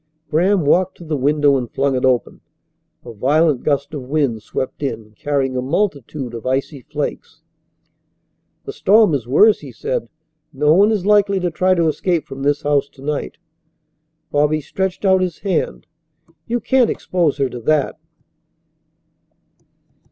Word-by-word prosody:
Graham 180 +2 +2
walked 185 +5 +2
to - - -12
the 160 -2 -3
window 145 +1 +2
and 125 -3 -4
flung 135 -1 0
it 125 - -2
open. 130 -2 0 0.6
A 120 - -8
violent 145 +5 +2
gust 145 +1 -1
of 145 - -4
wind 130 -4 -1
swept 130 +6 -5
in, 115 -6 -4
carrying 135 0 -1
a 125 - 0
multitude 140 - -2
of 115 - -7
icy 135 +2 -2
flakes. - - -6 1.2
"The - - -6
storm 210 -3 +4
is 125 -5 -2
worse," 210 - +5
he - - -10
said. 485 +2 -3 0.4
"No 150 +1 +2
one 200 +5 +5
is 205 -4 -1
likely 205 -1 +3
to 175 -1 -1
try 185 +3 +2
to 170 -2 +2
escape 160 +1 0
from 135 -2 -9
this 145 +2 0
house 145 -1 +1
to 135 - -16
night." 150 0 -3 0.9
Bobby 150 +1 +2
stretched 190 +6 -3
out 190 -1 +4
his 180 -3 -2
hand. 155 - -2 0.6
"You 240 +1 -1
can't 250 +1 +2
expose 170 -6 0
her 135 -2 +1
to 125 - -6
that." 150 +4 0
150 Hz, 155 wpm, -19 LUFS, 135-185 Hz, 1.2 s, worse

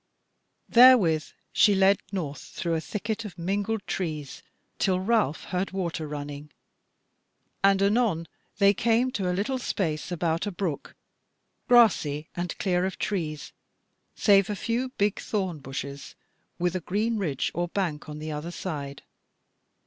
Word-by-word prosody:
Therewith 225 -11 +6 0.3
she 205 - +5
led 195 +1 +4
north 155 -8 -4
through 170 -2 -4
a 160 - 0
thicket 210 +4 -3
of 195 -5 -9
mingled 200 +4 -2
trees 155 -6 -4 0.4
till 185 -2 +2
Ralph 195 - +1
heard 185 +1 -2
water 170 -4 -3
running, 145 0 -6 1.1
and 195 0 +5
anon 200 -6 +2 0.3
they 200 0 +5
came 235 +4 +2
to 195 -6 -1
a 180 - -1
little 255 +6 -1
space 165 -9 -2
about 170 +1 -1
a - - -2
brook, 175 -5 -4 0.7
grassy 165 - +4
and 175 0 -3
clear 180 -2 +1
of 190 0 -2
trees 160 -7 -3 0.6
save 200 -2 +4
a 210 - -1
few 240 +5 -1
big 205 -5 0
thorn 190 -7 -2
bushes, 140 +1 -7 0.4
with 180 +1 0
a 185 - -1
green 215 +6 -1
ridge 150 -9 -1
or 175 0 -1
bank 170 -5 -3
on 150 - -6
the 155 +1 -5
other 150 +3 -4
side. 145 -6 -6
185 Hz, 140 wpm, -27 LUFS, 155-205 Hz, 1.1 s, Therewith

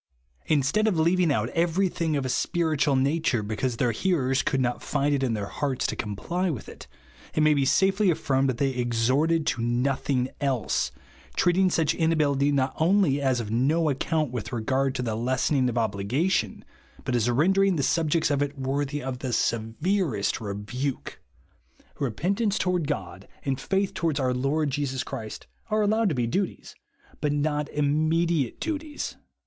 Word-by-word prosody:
Instead 155 +9 +2
of 195 -6 +1
leaving 170 +1 +3
out 115 -4 0
every 170 +5 +1
thing 165 -3 -1
of 140 -2 -1
a - - -2
spiritual 155 -2 +1
nature, 135 -3 +1
because 115 +3 -2
their 120 -2 +2
hearers 135 - +1
could 135 - 0
not 125 -1 -1
find 145 -1 0
in 120 -4 0
their 105 -2 -3
hearts 135 +5 -2
to - - -1
comply 170 - -2
with 130 - -5
it, - - -11 0.5
it 155 - +2
may 155 0 +5
be 140 -2 +1
safely 190 +8 +3
affirmed 135 -5 +1
that 125 - -1
they 135 +1 +1
exhorted 130 +7 +1
to 130 - -1
nothing 125 +2 0
else, 135 -5 0 0.4
treat 175 - +3
ing 190 -1 +4
such 160 -4 +1
inability 145 -4 +2
not 135 -1 +1
only 165 -4 +3
as 130 -3 +1
of 110 -3 -4
no 150 +7 +2
ac 135 - -3
count 155 -5 0
with 120 -4 -5
regard 130 +4 0
to 125 - -2
the 115 -3 -2
lessening 130 +3 +1
of 120 - -4
obli 105 -4 -1
gation, 135 - 0 0.4
but 125 - 0
as 120 0 +2
rendering 190 +9 +3
the 145 - 0
subjects 160 +1 +1
of 140 0 +1
it 145 0 -2
worthy 140 +2 -2
of 130 -1 -4
the 130 -1 -3
severest 115 - 0
rebuke 115 +6 -4 0.8
Repentance 195 - 0
toward 180 -4 0
God, 95 - -5 0.2
and 135 -1 -1
faith 195 0 0
towards 160 -4 -1
our 130 -2 +1
Lord 140 +4 0
Jesus 135 -2 -2
Christ, 110 -6 -7 0.2
are 215 0 +2
allowed 215 +1 +2
to 155 - -1
be 120 -2 0
duties, 190 +11 -3 0.5
but 150 -1 0
not 145 0 0
ii7iw.ecliate 155 0 +1
duties. 305 -2 -4
140 Hz, 170 wpm, -26 LUFS, 125-165 Hz, 0.8 s, may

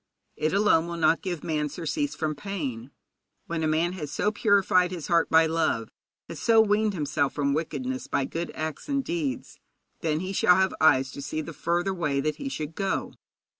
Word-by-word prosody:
It 155 - 0
alone 195 -5 +3
will 170 0 -5
not 165 0 +3
give 175 -6 -4
man 150 -2 -1
surcease 170 - -3
from 155 -1 -1
pain. 140 - -5 0.6
When 165 -1 -3
a 160 - +1
man 165 +3 +1
has 150 -6 -6
so 210 - 0
purified 200 -4 +3
his 175 -4 -6
heart 170 -1 +3
by 160 0 +6
love, 160 -9 0 0.4
has - - -8
so 225 -1 +4
weaned 210 -1 +3
himself 145 -3 0
from 140 -1 +1
wickedness 255 - -3
by 135 - 0
good 170 +4 -4
acts 155 - -5
and 275 -1 0
deeds, 315 -5 -3 0.4
then 155 -1 -1
he 185 +1 -4
shall 180 -1 +5
have 190 +1 +2
eyes 130 -4 +4
to 140 - -8
see 155 +2 -3
the 165 +1 -8
further 175 +5 0
way 150 -6 -1
that 155 +2 -1
he 280 - -4
should 155 - -5
go. 195 +3 -2
165 Hz, 195 wpm, -26 LUFS, 155-195 Hz, 0.6 s, by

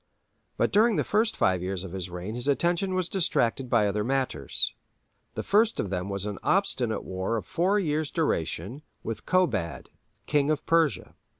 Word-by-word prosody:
But - - +2
during 220 +2 +4
the - - +1
first 215 +2 +1
five 95 -1 +2
years 95 0 -3
of 95 - -7
his 95 -1 -5
reign 90 +4 -5
his 120 +3 -4
attention 175 +6 +1
was 185 -2 0
distracted 135 -9 0
by 115 -4 +4
other 105 +1 0
matters. 130 - -1 0.6
The - - -3
first 215 +3 +3
of 100 - -2
them 90 +1 -2
was 100 0 -2
an 105 -1 -4
obstinate 130 - +1
war 95 +5 -2
of 110 - -5
four 190 +5 +1
years' 155 -4 0
duration, 120 - -2 0.2
with 110 -2 -5
Kobad, 175 - 0 0.3
King 145 -1 +2
of 155 -1 0
Persia. 160 - +1
130 Hz, 175 wpm, -27 LUFS, -, 0.6 s, during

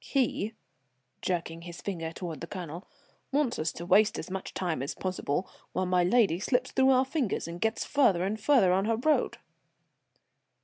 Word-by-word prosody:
He," 235 -5 0 0.7
jerking 165 -2 -2
his 170 0 -9
finger 165 -5 -4
toward 165 -2 -6
the 165 - -5
Colonel, 175 -1 -7 0.4
"wants 275 -3 +1
us 155 0 0
to 170 - -7
waste 200 +4 +4
as 160 - -6
much 190 0 -4
time 170 -7 -1
as 140 - -3
possible, 185 -2 -2 0.3
while 185 - 0
my 180 -1 +3
lady 190 -3 +3
slips 250 +4 0
through 265 0 +4
our 260 0 +5
fingers 265 - -1
and 170 +1 -7
gets 220 0 0
farther 230 -12 +3
and 205 +3 -1
farther 220 -8 +5
on 190 +2 +2
her 225 0 +1
road." 305 +6 +1
190 Hz, 175 wpm, -29 LUFS, 170-240 Hz, 0.7 s, our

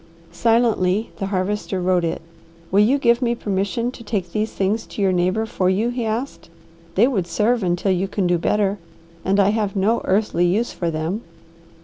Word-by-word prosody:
Silently 225 -2 +2
the 195 - -3
Harvester 195 0 -2
wrote 180 -1 +1
it. 165 0 -2 0.5
"Will 195 - +4
you 230 +7 +4
give 235 -3 +3
me 240 -1 +1
permission 205 +3 -1
to 245 - -12
take 195 -6 -3
these 215 +3 -1
things 200 +3 -1
to - - -9
your 195 -2 +3
neighbour 185 +5 +1
for 185 -4 0
you?" 210 +5 +1
he 245 -1 -3
asked. 230 -2 -4 0.5
"They 210 - +5
would 195 -10 -1
serve 225 +7 +1
until 180 +1 0
you 185 +1 0
can 195 0 -1
do 175 -1 +2
better, 205 +2 +1 0.4
and 195 +2 +1
I 200 0 +5
have 210 -1 -1
no 210 +4 +2
earthly 190 -3 +1
use 215 +7 0
for 170 - -2
them." 165 +7 -2
200 Hz, 190 wpm, -21 LUFS, 185-225 Hz, 0.5 s, They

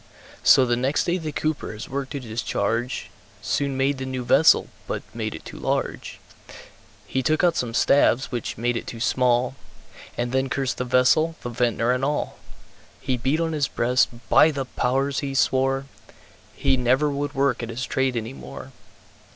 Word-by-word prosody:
So 130 - +6
the 120 -1 +1
next 130 +4 +1
day 180 +1 0
the 155 -2 -4
Cooper 155 +1 -2
his 105 +1 -8
work 135 0 -4
to 140 - -4
discharge, 115 0 -2 0.3
Soon 140 -2 -1
made 135 0 +1
the 130 - -4
new 130 -1 -4
vessel, - - +5 0.2
but - - -3
made - - -4
it - - -11
too - - -9
large; - - -2 0.9
He 130 - -1
took 155 +6 +1
out 175 -2 +4
some 115 -2 -2
staves, 135 -1 +3
which 120 -3 -4
made 120 +2 0
it - - -4
too 115 - -7
small, 125 +1 +2 0.6
And 120 0 -1
then 130 +1 0
cursed 130 -2 -1
the 125 - -1
vessel, 130 +6 +3
the 120 - -3
Vintner 120 0 +1
and 125 +1 0
all. 145 +2 -2 0.6
He 130 -1 -1
beat 135 +6 0
on 165 -1 0
his 145 -3 +1
breast, 125 +1 +2 0.2
"By 155 - +6
the 140 -3 -3
Powers!" 135 +2 0
he 135 -1 -4
swore, 135 0 +2 0.7
He 130 - +2
never 130 +4 +2
would 145 +1 -3
work 135 -3 +1
at 115 - -5
his 120 +2 -4
trade 130 -2 0
any 115 +2 -4
more. 70 - -10
130 Hz, 180 wpm, -24 LUFS, 120-140 Hz, 0.9 s, So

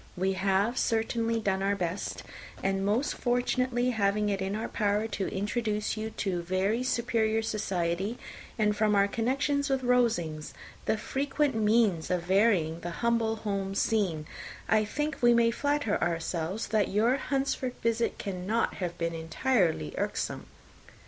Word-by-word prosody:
We 190 +2 +1
have 195 +5 +1
certainly 230 0 0
done 195 -3 0
our 200 +1 +1
best; 180 0 -3 0.4
and 195 0 0
most 215 +8 +1
fortunately 245 0 +1
having 210 -1 +1
it 195 -1 -1
in 190 +1 -1
our 220 - -3
power 210 0 0
to 200 -3 -2
introduce 210 +2 -1
you 220 0 -3
to 180 -3 -1
very 190 +6 0
superior 225 -3 +1
society, 195 0 -1 0.4
and 210 -2 +2
from 210 0 +2
our 200 0 +4
connection 270 +6 0
with 265 -1 0
Rosings, 220 -12 +1 0.3
the 220 - +1
frequent 280 +5 0
means 215 -6 +2
of 180 -2 0
varying 185 -4 +2
the 175 - -5 0.2
humble 230 -1 +2
home 200 -3 -3
scene, 190 -8 +1 0.4
I 215 -1 +3
think 295 +8 -3
we 240 -1 +6
may 230 0 +4
flatter 285 -3 0
ourselves 170 +3 -1
that 215 -1 +2
your 225 +6 +2
Hunsford 270 -2 -1
visit 230 0 +1
cannot 200 +3 -1
have 175 -2 -3
been 170 0 -1
entirely 165 - 0
irksome. - - -2
210 Hz, 145 wpm, -29 LUFS, 190-235 Hz, 0.4 s, we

